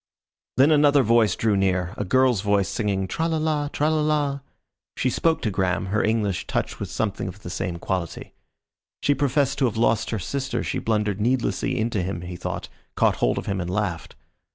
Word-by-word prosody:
Then 140 Hz, +4 st, +6 dB
another 145 Hz, -2 st, +5 dB
voice 115 Hz, -4 st, +3 dB
drew 110 Hz, -3 st, +1 dB
near, 95 Hz, -2 st, +1 dB
a -, -, -2 dB
girl's 125 Hz, +1 st, +3 dB
voice 100 Hz, -1 st, +2 dB
singing, 100 Hz, -4 st, -1 dB
"tralala 155 Hz, -, 0 dB
tralala." 150 Hz, -2 st, +1 dB, 0.6 s
She 130 Hz, -, +1 dB
spoke 160 Hz, +5 st, +1 dB
to 110 Hz, -, 0 dB
Graham, 95 Hz, -1 st, 0 dB
her 110 Hz, -, +2 dB
English 105 Hz, -4 st, 0 dB
touched -, -, -2 dB
with -, -, -4 dB
something 100 Hz, -3 st, -2 dB
of 95 Hz, +2 st, -9 dB
the 90 Hz, -, -6 dB
same 90 Hz, -2 st, -3 dB
quality. 90 Hz, -1 st, -4 dB, 0.7 s
She 145 Hz, -, +4 dB
professed 140 Hz, 0 st, +1 dB
to 135 Hz, -, +3 dB
have 115 Hz, -3 st, -1 dB
lost 115 Hz, -1 st, +2 dB
her 110 Hz, -, -1 dB
sister, 130 Hz, +5 st, -3 dB
she -, -, -2 dB
blundered 105 Hz, -2 st, 0 dB
needlessly 125 Hz, +1 st, 0 dB
into 110 Hz, -3 st, 0 dB
him 90 Hz, -1 st, -3 dB
he 90 Hz, 0 st, -6 dB
thought, -, -, -5 dB, 0.3 s
caught -, -, +2 dB
hold -, -, +1 dB
of -, -, -3 dB
him 95 Hz, -1 st, -2 dB
and 90 Hz, -, -4 dB
laughed. 95 Hz, -4 st, -2 dB
110 Hz, 180 wpm, -24 LUFS, 95-135 Hz, 0.7 s, Then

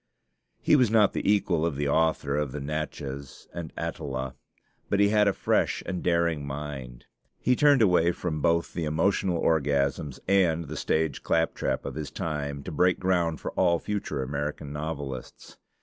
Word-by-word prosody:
He -, -, +4 dB
was 125 Hz, -6 st, +4 dB
not 110 Hz, -2 st, +4 dB
the -, -, +1 dB
equal 90 Hz, -6 st, +2 dB
of 85 Hz, -3 st, 0 dB
the 70 Hz, +1 st, -1 dB
author 75 Hz, -2 st, +1 dB
of 75 Hz, -3 st, -1 dB
'The 75 Hz, -, -4 dB
Natchez' 70 Hz, -2 st, -5 dB
and 85 Hz, -3 st, -6 dB
'Atala'; 65 Hz, -2 st, -4 dB, 0.6 s
but 100 Hz, -, +1 dB
he 100 Hz, 0 st, +5 dB
had 105 Hz, -1 st, +4 dB
a -, -, +5 dB
fresh -, -, 0 dB
and 90 Hz, -1 st, -3 dB
daring 85 Hz, -3 st, +1 dB
mind. 70 Hz, -4 st, -6 dB, 0.3 s
He 125 Hz, -, +2 dB
turned 145 Hz, -3 st, +5 dB
away 90 Hz, -3 st, +4 dB
from 85 Hz, -3 st, -3 dB
both 85 Hz, +2 st, +1 dB
the 85 Hz, -, -2 dB
emotional 85 Hz, +3 st, +1 dB
orgasms 70 Hz, -3 st, +1 dB
and 90 Hz, -4 st, +3 dB
the 75 Hz, +2 st, -7 dB
stage 80 Hz, +1 st, 0 dB
claptrap 80 Hz, 0 st, 0 dB
of -, -, -4 dB
his 75 Hz, -1 st, -5 dB
time, 70 Hz, -3 st, -4 dB
to -, -, -6 dB
break 90 Hz, +4 st, +2 dB
ground 90 Hz, -4 st, +1 dB
for -, -, -5 dB
all 85 Hz, 0 st, +3 dB
future 100 Hz, -8 st, -3 dB
American 70 Hz, +1 st, -4 dB
novelists. 70 Hz, -4 st, -6 dB
80 Hz, 165 wpm, -27 LUFS, 70-90 Hz, 0.6 s, he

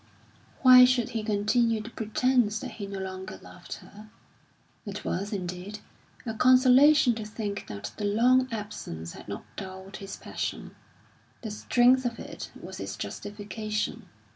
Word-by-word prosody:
Why 255 Hz, -1 st, +10 dB
should 250 Hz, -2 st, +3 dB
he 225 Hz, -, -2 dB
continue 220 Hz, +2 st, +1 dB
the 220 Hz, +2 st, -8 dB
pretence 220 Hz, 0 st, +1 dB
that -, -, -6 dB
he 200 Hz, -3 st, -7 dB
no 195 Hz, 0 st, -6 dB
longer 190 Hz, 0 st, -6 dB
loved -, -, -10 dB
her? 210 Hz, +1 st, -14 dB, 0.7 s
It 205 Hz, -1 st, -7 dB
was, 200 Hz, +3 st, -2 dB
indeed, 185 Hz, +1 st, -5 dB, 0.5 s
a 225 Hz, -, -3 dB
consolation 255 Hz, +3 st, +6 dB
to 220 Hz, -1 st, -5 dB
think 210 Hz, -1 st, -5 dB
that 105 Hz, +1 st, -6 dB
the 205 Hz, -, -2 dB
long 250 Hz, +5 st, +4 dB
absence 85 Hz, -, -6 dB
had -, -, -12 dB
not 100 Hz, 0 st, -6 dB
dulled 190 Hz, 0 st, -8 dB
his 195 Hz, 0 st, -8 dB
passion; -, -, -5 dB, 0.7 s
the 220 Hz, -, -4 dB
strength 245 Hz, +4 st, +3 dB
of 235 Hz, -2 st, -2 dB
it -, -, -8 dB
was -, -, -9 dB
its -, -, -5 dB
justification. 210 Hz, +1 st, -4 dB
215 Hz, 145 wpm, -28 LUFS, 200-245 Hz, 0.7 s, Why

